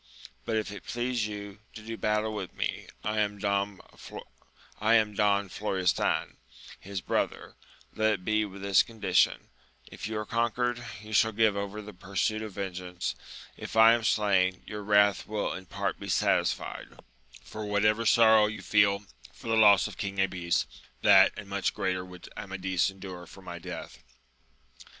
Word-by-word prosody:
but 115 - -1
if 110 -2 -1
it 100 - -9
please 120 -2 -2
you 100 -1 -8 0.2
to 110 - -9
do 115 +1 -5
battle 105 0 0
with 100 -4 -6
me, - - -3 0.2
who - - -1
am 105 -1 0
Don 100 -1 -1 1.7
Florestan, 95 -2 -1 0.4
his 100 -1 -6
bro - - +1
ther, - - -14 0.4
let 110 0 +2
it 90 - -6
be 110 0 +2
with; 100 -1 -8
this 100 -2 +5
condition: 105 -5 +1 0.4
if - - -6
you 110 0 -3
are 105 - -3
conquered, 120 +2 -1 0.2
you 110 0 -9
shall 110 +1 +4
give 110 -1 +2
over 100 +1 -4
the 105 0 -10
pursuit 100 +3 -2
of 110 -2 -6
vengeance; 90 -2 -4 0.4
if - - -8
I 110 +1 +8
am 120 -1 0
slain, 95 -4 +2
your 105 0 -6
wrath 105 -1 +3
will 105 -1 -2
in 95 -1 -8
part - - -3
be - - -7
satisfied, - - 0 0.6
for 110 - -7
whatever 105 +2 +2
sorrow 110 -1 +6
you 105 0 -6
feel 100 -1 +3 0.3
for - - -10
the 115 - +2
loss 105 -3 +6
of 100 -4 -10
King 100 -2 -4
Abies, 90 -3 +1 0.4
that - - +7
and 100 - -8
much 100 -1 -1
greater 90 -1 -1
would 90 -1 -12
Amadis 95 -2 -1
endure 95 -3 -9
for 95 - -14
my 85 -1 -7
death. - - -8
105 Hz, 160 wpm, -28 LUFS, 95-110 Hz, 1.7 s, I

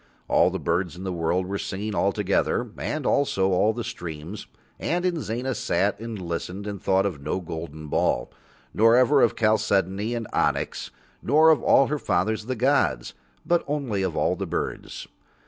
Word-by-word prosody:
All - - +4
the - - -3
birds 85 -1 -1
in 90 - -8
the 95 -1 -3
world 85 +2 0
were 100 +2 -3
singing 105 +2 -4
all 100 -1 +2
together 105 +4 0
and 155 -3 -3
also 95 -9 +2
all 95 +4 +3
the 120 +1 -4
streams, 85 -4 -7 0.3
and 175 +1 -1
Inzana 130 -7 -1
sat 100 +1 0
and 115 -2 -6
listened 90 +3 -5
and 100 -2 -5
thought 95 -1 +2
of 85 -8 -3
no 75 +6 -2
golden 80 -3 -7
ball, - - 0 0.4
nor 115 +2 +5
ever 130 +3 +5
of 115 - +3
chalcedony 105 0 +1
and 115 -1 -3
onyx, - - 0 0.3
nor 155 +5 +5
of 155 - +3
all 135 - +5
her 150 +2 -2
fathers 110 +2 0
the 130 - -1
gods, 125 - +1 0.3
but 175 0 +2
only 135 -9 -1
of 95 -4 -2
all - - +2
the - - -4
birds. - - -4
105 Hz, 175 wpm, -25 LUFS, 90-120 Hz, 0.4 s, nor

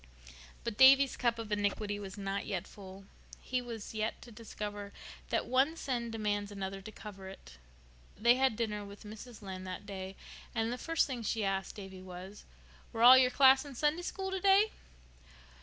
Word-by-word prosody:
But 230 -3 -4
Davy's 270 +1 +7
cup 235 -1 0
of 225 -2 -7
iniquity 205 0 -1
was 195 -1 -8
not 195 0 -3
yet 190 -3 -3
full. 195 -1 -12 0.3
He 255 0 -2
was 230 -3 -7
to 220 +2 -4
discover 205 -2 -7 0.4
that - - 0
one 270 +6 +2
sin 245 -6 -2
demands 205 -2 -2
another 195 -1 -5
to 215 - -9
cover 195 -3 -10
it. - - -13 0.6
They 235 +3 +5
had 260 -2 +2
dinner 210 -2 -2
with 200 +1 -11
Mrs. 220 +2 -10
Lynde 185 -1 -7
that 185 +2 -6
day, 190 -1 -6 0.4
and 225 +1 0
the 250 - -6
first 330 0 +1
thing 255 -4 -5
she 220 0 -1
asked 195 0 -2
Davy 190 -2 -9
was, 185 +2 -10 0.5
"Were 230 -1 -1
all 250 +2 +11
your 260 -1 +6
class 265 0 +6
in 285 -3 -10
Sunday 300 +6 +1
School 385 +2 -4
today?" 390 +3 +4
215 Hz, 175 wpm, -32 LUFS, 200-250 Hz, 0.6 s, all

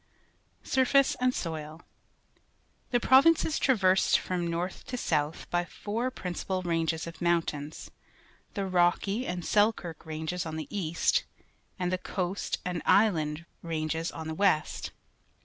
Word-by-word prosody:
Surface 265 +1 +3
and 250 0 +3
Soil. 160 -5 -5 0.5
— - - -40
The 245 - +2
province 275 +7 +6
is 315 - -1
trav 260 -7 +2
ersed 185 +1 +5
from 180 -2 -2
north 170 +2 -3
to 250 - -4
south 155 -7 -1
by 175 0 +2
four 220 +7 -3
principal 185 -4 -4
ranges 165 -2 0
of 165 -1 -9
mountains 160 -3 -1 0.3
— - - -32
the 200 -2 -1
Rocky 185 +5 +1
an 180 0 -3
d^ - - -10 0.3
elkirk^ 170 -7 -9
R - - -6
anges 160 +3 -3
on 160 -1 -5
the 160 - -4
east, 175 -4 +1 0.5
and 180 -1 -1
the 185 - 0
Coast 185 +1 -2
and 180 -2 -2
Islan 160 -8 +3
d^ 165 - -13 0.2
Rang 160 -1 -2
es 165 +1 -2
on 160 -1 -7
the 160 - -3
west. 160 -4 +1
175 Hz, 160 wpm, -29 LUFS, 160-200 Hz, 0.5 s, province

